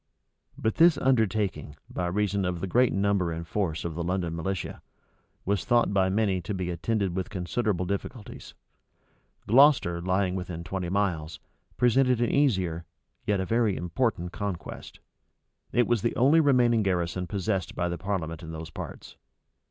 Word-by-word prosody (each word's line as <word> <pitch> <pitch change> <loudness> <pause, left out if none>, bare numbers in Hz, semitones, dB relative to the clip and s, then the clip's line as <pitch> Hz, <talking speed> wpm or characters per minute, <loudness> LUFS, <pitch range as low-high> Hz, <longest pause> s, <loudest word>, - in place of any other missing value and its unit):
But 110 0 -1
this 165 -2 +6
undertaking, 110 - 0
by 90 - -3
reason 100 +1 0
of 90 -1 -2
the 95 - -2
great 125 +6 +3
number 100 -3 +1
and 85 +1 -5
force 85 -4 -2
of 85 - -3
the 85 +2 -3
London 85 -1 -1
militia, 90 +3 -4 0.6
was 100 -3 0
thought 120 +2 +2
by 95 -1 +3
many 100 -2 +1
to 95 +4 -4
be 90 -1 -2
attended 95 +1 -1
with 95 -1 -3
considerable 95 0 -1
difficulties. 100 +4 -6 0.9
Gloucester, 120 - +5
lying 95 +1 +1
within 90 -2 -5
twenty 90 0 -4
miles, 85 -5 -1 0.4
presented 125 0 +3
an 120 - +1
easier, 95 - +1 0.4
yet 100 -2 +2
a 95 - -1
very 115 -2 +1
important 90 +1 -1
conquest. 95 -5 -6 0.7
It 120 - +3
was 120 -4 +1
the 115 - -1
only 140 +7 +5
remaining 125 -6 +4
garrison 90 -2 -1
possessed 95 -2 -2
by 90 - 0
the 85 -1 -4
parliament 85 -4 -3
in 80 -1 -8
those 80 0 -7
parts. - - -9
95 Hz, 155 wpm, -27 LUFS, 85-110 Hz, 0.9 s, this